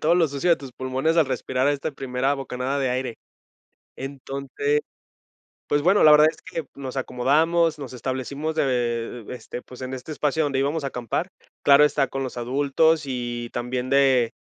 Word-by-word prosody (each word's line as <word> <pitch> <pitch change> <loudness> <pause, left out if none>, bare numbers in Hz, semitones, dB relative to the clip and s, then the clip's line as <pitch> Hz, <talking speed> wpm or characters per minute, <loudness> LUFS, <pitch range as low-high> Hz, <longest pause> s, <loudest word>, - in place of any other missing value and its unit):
todo 165 +3 +3
lo 170 -2 +4
sucio 140 +5 -1
de 170 - +6
tus 135 -3 -10
pulmones 130 +6 -1
al 160 -4 +5
respirar 130 0 -1
a - - +3
esta 145 +2 -3
primera 135 +1 -1
bocanada 135 0 -3
de 130 -2 +1
aire. 125 -2 -2 0.8
Entonces, 140 +2 -2 0.9
pues 145 0 +2
bueno, 190 +5 +4
la 155 - +8
verdad 150 +1 +8
es - - -17
que 165 - -5
nos 135 -1 -7
acomodamos, 155 +6 +2
nos 135 -3 -7
establecimos 135 +5 -3
de, - - +2 0.6
eh, - - -13
este, 125 0 -7
pues 125 0 -12
en 130 +1 -4
este 130 +4 -8
espacio 150 +1 0
donde 140 -2 0
íbamos 145 +3 0
a 140 - -1
acampar, 125 -3 -3 0.3
claro, 140 +1 +7
está 145 -2 +2
con 135 - -3
los 125 - -6
adultos 145 +6 +2
y 120 -2 -4
también 125 +1 -3
de 135 -4 +4
135 Hz, 185 wpm, -24 LUFS, 130-150 Hz, 0.9 s, la